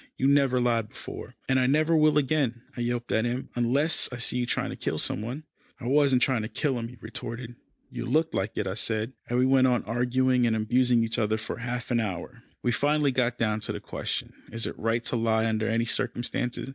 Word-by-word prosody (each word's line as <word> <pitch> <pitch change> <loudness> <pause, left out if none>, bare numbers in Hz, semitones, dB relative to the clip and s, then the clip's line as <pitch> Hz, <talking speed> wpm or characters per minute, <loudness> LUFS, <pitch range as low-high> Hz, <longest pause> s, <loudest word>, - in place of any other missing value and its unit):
"You 130 - 0
never 140 -3 +4
lied 115 -3 +1
before." - - -8
"And 130 -1 +3
I 125 - +3
never 155 +4 +3
will 155 -1 +4
again," 135 -5 +1
I 120 - -4
yelped 120 0 -2
at 110 - +2
him, 120 +2 -2
"unless 135 +7 +2
I 125 - -5
see 120 +1 +1
you 120 - -1
trying - - -1
to - - -5
kill - - -2
some - - 0
one." 125 +8 -5 0.4
"I - - -8
wasn't 135 -1 +4
trying 130 -4 +2
to 110 - -3
kill 130 +2 -1
him," 115 - -4
he 125 +1 -13
retorted. 115 +2 -6 0.4
"You 120 - -5
looked 160 +6 +1
like 95 +3 -2
it," - - 0
I 95 - -2
said, 110 +3 -1 0.2
and 120 - +1
we 125 - +4
went 130 0 +5
on 125 -2 +2
arguing 125 +2 +2
and 110 - +2
abusing 120 +2 +3
each 115 0 -1
other 110 0 +1
for 110 - -5
half 120 +1 -4
an 120 - +3
hour. 110 +4 -4 0.2
We 120 - +2
finally 145 +3 +2
got 125 -1 0
down 110 -1 0
to 110 - -3
the - - -4
question, - - -4 0.2
is 115 0 -1
it - - -3
right 115 +1 0
to - - -1
lie 115 -1 +2
under 110 -1 0
any 115 +1 +1
circumstances? 120 +2 -1
120 Hz, 230 wpm, -27 LUFS, 115-130 Hz, 0.4 s, went